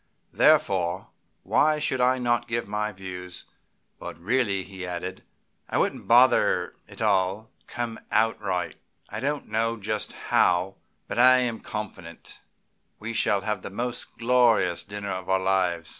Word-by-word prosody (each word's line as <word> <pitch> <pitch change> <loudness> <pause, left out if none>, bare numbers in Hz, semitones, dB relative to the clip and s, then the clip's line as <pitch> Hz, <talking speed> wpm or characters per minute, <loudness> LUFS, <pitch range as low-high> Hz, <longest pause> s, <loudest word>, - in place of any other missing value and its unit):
Therefore, 90 -1 +2 0.3
why 155 0 +3
should 130 -4 0
I 130 +1 +3
not 120 -1 0
give 120 -1 -2
my 105 +1 -2
views? 90 -2 -8 0.5
But - - -8
really," 100 +1 0
he 95 -1 -9
added, 90 +1 -5 0.5
"I - - -1
wouldn't - - -1
bother; - - +4
it'll 110 - -3
all 100 +2 0 0.2
come 120 -2 -4
out 110 +1 +1
right. 95 -3 -2 0.3
I 110 - -5
don't 145 +4 -2
know 115 +2 0
just 105 0 -3
how, 90 +2 +1 0.3
but - - -3
I 130 +1 +7
am 120 -3 -1
confident 100 -6 -8 0.6
we 115 +2 -6
shall 100 -3 +1
have 105 +2 -2
the - - -7
most 120 +5 -4
glorious 115 -7 +3
dinner 100 0 -6
of 95 -1 -5
our 95 - +4
lives. 95 -3 0
105 Hz, 145 wpm, -26 LUFS, 95-120 Hz, 0.6 s, I